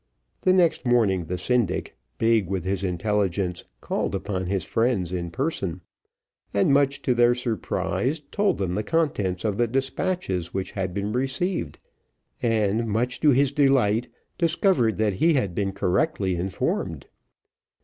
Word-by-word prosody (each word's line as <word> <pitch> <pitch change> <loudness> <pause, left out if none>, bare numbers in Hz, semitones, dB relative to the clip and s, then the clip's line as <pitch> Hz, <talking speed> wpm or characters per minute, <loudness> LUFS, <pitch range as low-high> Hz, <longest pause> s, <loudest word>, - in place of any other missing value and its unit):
The 185 - +3
next 180 -3 +3
morning, 110 -8 +2
the 90 +3 -3
syndic, 115 -4 0 0.2
big 115 -4 +2
with 95 -3 -2
his 95 0 -1
intelligence, 95 -1 -1 0.2
called - - -2
upon 95 -1 -3
his 95 0 -1
friends 115 -7 0
in 85 -2 -3
person, 95 - -2 0.7
and 100 +8 +3
much 140 0 +2
to 125 - +2
their 120 0 +4
surprise 125 +4 -1
told 205 -1 +1
them 95 -3 -2
the 105 - 0
contents 105 - -1
of 105 -1 -1
the 120 - +3
despatches 135 - -2
which 95 -1 -2
had 95 -2 -3
been 100 +1 -2
received 135 - -1 0.6
and, 115 -1 +1
much 120 +4 -1
to 150 - +4
his 140 0 +4
delight, 130 -6 +3 0.3
discovered 165 - +2
that 105 -2 +1
he 160 - +3
had 100 -10 0
been 100 +1 -1
correctly 95 - 0
informed. 90 +2 -2
110 Hz, 145 wpm, -25 LUFS, 95-135 Hz, 0.7 s, their